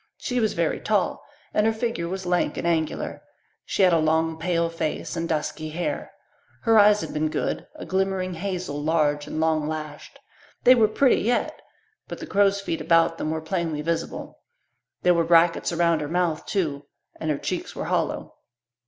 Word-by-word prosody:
She 250 0 -2
was 220 -3 +1
very 170 -2 0
tall 205 -4 0 0.3
and 210 +1 +3
her - - +4
figure 220 -6 -2
was 190 +1 -4
lank 180 0 0
and - - -3
angular. 160 -2 -1 0.4
She 195 - +1
had 180 -2 +5
a 165 - +4
long, 160 +1 +1
pale 170 -1 +1
face 165 -1 -3
and 165 0 -3
dusky 155 0 -2
hair. 170 +3 -3 0.5
Her 225 -2 +5
eyes 210 0 +6
had - - -6
been 155 +1 0
good - - -2
a - - -8
glimmering 190 -1 -1
hazel, 180 -4 -4
large 150 -2 +1
and 155 - -4
long 160 -1 +1
lashed. 155 -1 -6 0.5
They 255 - +8
were 225 -4 +4
pretty 270 +4 +3
yet, 240 +3 0 0.5
but - - -6
the - - -7
crow's 200 0 +2
feet 170 -4 -3
about 165 0 +3
them 155 - -2
were 160 0 -2
plainly 160 -2 -2
visible. 165 +1 -3 0.6
There 180 - +5
were 170 -1 +2
brackets 165 +1 +3
around 170 -1 +2
her 150 - -3
mouth 170 -2 0
too, 145 -8 -2 0.3
and 160 - -3
her 150 - +1
cheeks - - -4
were - - -4
hollow. - - -1
170 Hz, 180 wpm, -24 LUFS, 155-190 Hz, 0.6 s, They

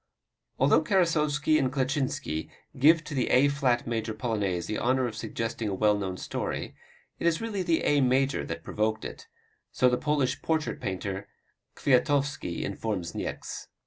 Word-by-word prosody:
Although 140 +4 +4
Karasowski 155 -4 +2
and 130 -3 +1
Kleczynski 130 - -1 0.3
give 155 +4 +6
to 155 - -7
the 130 -3 0
A 140 +3 +5
flat 130 -4 +1
major 110 -1 -2
Polonaise 105 -7 -1
the 105 +4 -2
honor 130 +1 +2
of 115 -3 -4
suggesting 115 0 -3
a 95 - -2
well 105 +1 +3
known 95 -2 -3
story, - - -4 0.5
it - - +1
is 165 -1 +2
really 220 -4 -2
the 170 -3 +1
A 145 -1 +3
major 135 +2 +2
that 80 0 -6
provoked 110 +1 -1
it - - -8 0.4
so 125 - +3
the 125 - +1
Polish 140 -3 0
portrait 160 -2 -1
painter 95 +1 -4 0.5
Kwiatowski 140 - +1
informed 95 -4 -3
Niecks. - - -5
130 Hz, 155 wpm, -28 LUFS, 110-145 Hz, 0.5 s, give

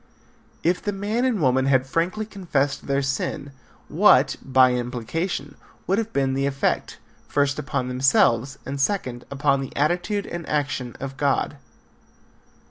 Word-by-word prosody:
If 175 +2 +1
the 205 - -2
man 210 +5 -1
and 245 -6 +1
woman 130 -2 +2
had 130 -1 +3
frankly 175 +9 -1
confessed 165 -10 -2
their 140 0 +1
sin, 140 +1 -3 0.4
what, - - +5
by 130 -1 +4
implication, 130 - -3 0.3
would 195 +3 +1
have 225 0 -3
been 135 -1 +1
the 135 +1 0
effect: 140 0 -1 0.3
first, 145 0 +1
upon 125 -1 -2
themselves, 130 0 +2
and 135 +1 -3
second, 130 -8 -1
upon 140 0 +1
the 135 - -7
attitude 180 +7 0
and 170 -1 -6
action 135 -4 -2
of 135 0 -6
God? 145 0 0
140 Hz, 140 wpm, -23 LUFS, 130-175 Hz, 0.4 s, what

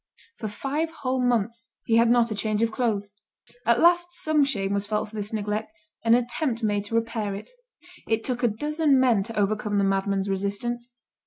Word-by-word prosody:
For 220 - -4
five 280 +9 -2
whole 260 -5 -2
months 235 -1 0 0.2
he 225 - +3
had 230 0 +5
not 235 -1 +3
a - - +1
change 215 +1 0
of 230 - +1
clothes. 215 -4 -1 0.6
At 235 0 +4
last 345 +1 +5
some 310 -3 +3
shame 200 -8 -1
was 200 0 -1
felt 215 0 -1
for 220 - -13
this 205 0 -3
neglect, 215 0 -2 0.3
and 230 0 +5
an 245 - +3
attempt 240 0 -2
was 220 - +1
made 205 -1 -1
to 225 - -4
repair 225 -3 -1
it. 205 - -9 0.6
It 225 0 0
took 250 -2 -2
a 240 - +4
dozen 295 +5 +1
men 245 -6 +4
to 225 +3 -6
overcome 210 0 0
the 200 - +3
madman's 195 0 0
resistance. 235 +5 -2
225 Hz, 200 wpm, -25 LUFS, 205-245 Hz, 0.6 s, had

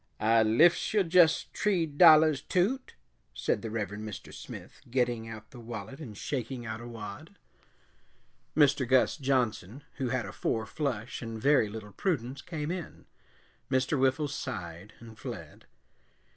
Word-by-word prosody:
"I 115 +1 +4
liffs 135 - +4
yo' 205 - +5
jess 170 -2 +5
tree 190 -5 +1
dollahs, 155 -1 +6
Toot," 200 - 0 0.4
said - - 0
the 115 - -5
Reverend 105 -1 -4
Mr. 110 -3 -8
Smith, - - -10
getting 120 -2 0
out 110 -1 -9
the 125 - -11
wallet 115 +2 -7
and 110 -10 -9
shaking 125 -2 -4
out 110 0 -5
a 120 - -8
wad. 115 - -9 1.2
Mr. 140 -3 +4
Gus 130 0 +4
Johnson, 130 - -1
who 130 -2 -1
had 125 -3 -1
a 95 - -7
four 110 -1 -1
flush 125 -6 -3
and 115 -2 -5
very 135 -3 +4
little 105 -1 -8
prudence, 135 - -2
came 155 -2 -4
in. 180 -3 -7 0.6
Mr. 130 +2 +1
Whiffles 135 +2 +1
sighed 95 - -6
and 115 -1 -13
fled. - - -8
130 Hz, 145 wpm, -29 LUFS, 110-150 Hz, 1.2 s, dollahs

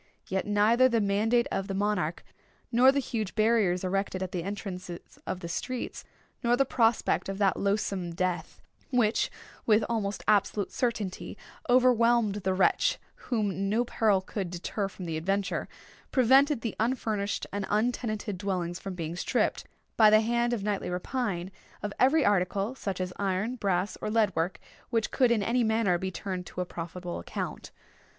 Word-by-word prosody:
Yet 190 +1 -2
neither 220 +5 +4
the 230 -2 +2
mandate 220 +4 +2
of 195 0 -2
the 195 - -3
monarch, 200 -5 -1 0.5
nor 250 +3 +6
the 280 - -2
huge 225 -7 -2
barriers 215 -5 +2
erected 190 0 -1
at 185 - -5
the 180 - -2
entrances 185 -2 -7
of 185 - -3
the 170 - -5
streets, 250 +8 -4 0.4
nor 240 0 +3
the 275 - +3
prospect 230 -5 +1
of 195 - -3
that 195 -2 +3
loathsome 195 -4 -1
death 175 -2 -2 0.3
which, 240 -4 +2 0.4
with 215 -1 +4
almost 210 -3 -2
absolute 205 -1 +2
certainty, 225 -6 -2 0.3
overwhelmed 240 -4 +4
the 190 -2 -1
wretch - - +3 0.3
whom 195 -5 0
no 230 +4 +2
peril 210 -5 +2
could 190 -1 -4
deter 180 +3 -3
from 190 -1 -9
the 165 -2 -3
adventure, 195 +4 -1 0.4
prevented 265 +1 +4
the 230 - -3
unfurnished 220 -3 -1
and 200 -1 -2
untenanted 215 -2 -1
dwellings 180 -3 -2
from 195 -2 -6
being 165 -1 -4
stripped, 180 - 0 0.3
by 215 -2 +8
the 215 0 +6
hand 235 +1 +1
of 230 -5 -2
nightly 205 -3 -1
rapine, 185 -1 -2 0.3
of 205 -1 -3
every 285 +4 +4
article, 200 +3 +1
such 195 -8 -4
as 180 0 -3
iron, 200 +5 -1
brass, 195 -3 -1
or - - -2
lead 220 -1 +2
work, 165 +3 -1 0.3
which 225 -2 0
could 255 -3 +3
in 225 -3 +2
any 240 +4 +2
manner 220 -5 +2
be 190 - -2
turned 185 -1 -5
to - - -8
a 180 - 0
profitable 175 +1 -6
account. 85 - -5
205 Hz, 165 wpm, -28 LUFS, 185-230 Hz, 0.5 s, by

